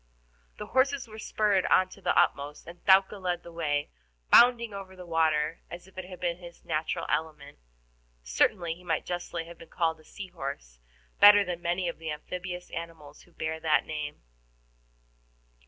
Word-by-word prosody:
The 210 - -6
horses 260 +3 +1
were 220 0 -11
spurred 210 -3 +1
on 185 - +4
to 195 - -14
the - - +1
utmost, 145 +1 +1
and 175 +1 -12
Thaouka 195 +1 +5
led 175 -1 -2
the 170 - -11
way, 150 -3 -1 0.4
bounding 235 -2 +6
over 195 -1 -8
the 180 -1 -10
water 160 -1 +1
as 175 +1 -9
if 190 - -20
it 185 -1 -6
had 180 -1 -10
been 175 -1 -1
his 175 -1 -13
natural 155 +1 -2
element. 155 - -3 0.6
Certainly 165 - +1
he 175 +2 -16
might 165 -3 -1
justly 175 -1 -4
have 170 0 -12
been 165 - -13
called 160 -2 0
a - - -18
sea 190 +4 -9
horse 135 - -7 0.4
better 205 0 +9
than 175 -1 -4
many 175 +1 -1
of 170 - -4
the 165 -1 -5
amphibious 180 +4 -6
animals 160 -3 -8
who 175 - -21
bear 160 -1 -4
that 155 -1 +2
name. 150 - -5
170 Hz, 175 wpm, -28 LUFS, 160-185 Hz, 0.6 s, better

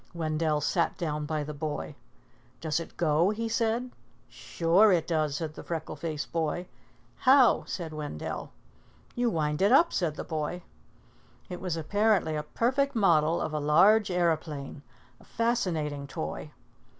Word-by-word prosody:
Wendell 155 -2 0
sat 165 +4 0
down 150 -3 -3
by 155 -1 -1
the 150 +1 -6
boy. 150 0 -4 0.7
"Does 160 0 -1
it 165 - -9
go?" 165 +2 +3
he 225 +2 -2
said. 230 +2 -1 0.4
"Sure 180 +6 +2
it 170 -3 +2
does," 155 -4 0
said 155 -1 -4
the - - -9
freckle 165 -2 -5
faced 155 0 -5
boy. 165 +2 -1 0.5
"How?" 260 -1 +5
said 165 -4 -5
Wendell. 150 - -5 0.6
"You 240 0 +1
wind 150 -4 -1
it 200 +3 +4
up," 335 +6 +5
said 165 -5 0
the - - -5
boy. 160 +2 -4 0.9
It 180 -1 -6
was 180 -3 -2
apparently 200 0 +1
a 150 - -1
perfect 260 - 0
model 165 -6 +3
of 155 - -3
a 150 - -1
large 195 +9 +4
aeroplane, 155 -5 -1 0.4
a - - -18
fascinating 165 -12 -1
toy. - - -5
165 Hz, 150 wpm, -28 LUFS, 150-205 Hz, 0.9 s, How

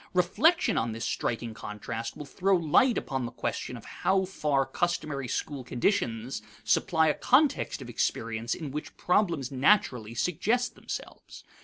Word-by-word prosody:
Reflection 300 - +3
on 115 0 -1
this 115 +1 -4
striking 115 -1 -2
contrast 110 +2 -6
will 150 - -7
throw 190 +7 +1
light 175 - +4
upon 130 -3 -2
the - - -8
question 125 0 -4
of 115 - -12
how 190 +1 +1
far 150 -7 0
customary 150 -2 -2
school 140 +1 -3
conditions 120 - -1 0.2
supply 160 +9 +3
a 150 - +4
context 270 - +2
of - - -10
experience 115 +1 -1
in 150 -5 -6
which 150 +2 -6
problems 170 - +1
naturally 130 - +2
suggest 220 - 0
themselves. - - -8
145 Hz, 145 wpm, -28 LUFS, 120-180 Hz, 0.2 s, light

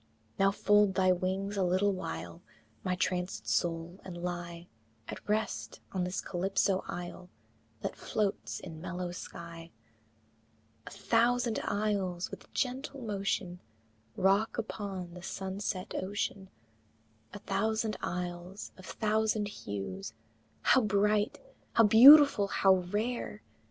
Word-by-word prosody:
Now 195 0 +5
fold 205 -1 +3
thy 185 -1 +4
wings 190 +3 -1
a 195 - +2
little 185 +3 +2
while, 85 - -6 0.4
My 185 -1 0
trancèd 180 0 -2
soul, 170 +1 -1
and 180 -2 -8
lie 175 -1 -5 0.4
At - - -6
rest 215 +1 -1
on 185 -2 -1
this 180 +1 -3
Calypso 190 +1 0
isle 180 +1 -7 0.5
That - - -3
floats 205 -2 -2
in 160 -3 -9
mellow 180 0 -4
sky, 170 -1 -9 1.2
A - - -4
thousand 235 +3 +1
isles 195 -4 -1
with - - -10
gentle 265 +1 -2
motion 195 -4 -2 0.6
Rock 195 +4 +2
upon 195 -6 -5
the 180 - -9
sunset 190 0 -4
ocean; 195 0 -3 0.8
A - - -7
thousand 215 +2 -1
isles 180 +2 -5
of 185 - -12
thousand 215 -1 0
hues, 95 - -6 0.5
How 265 - +5
bright! 210 0 +1 0.3
how 230 - +6
beautiful! 245 0 +9
how 195 -1 +4
rare! 230 +5 -2
195 Hz, 115 wpm, -31 LUFS, 180-210 Hz, 1.2 s, beautiful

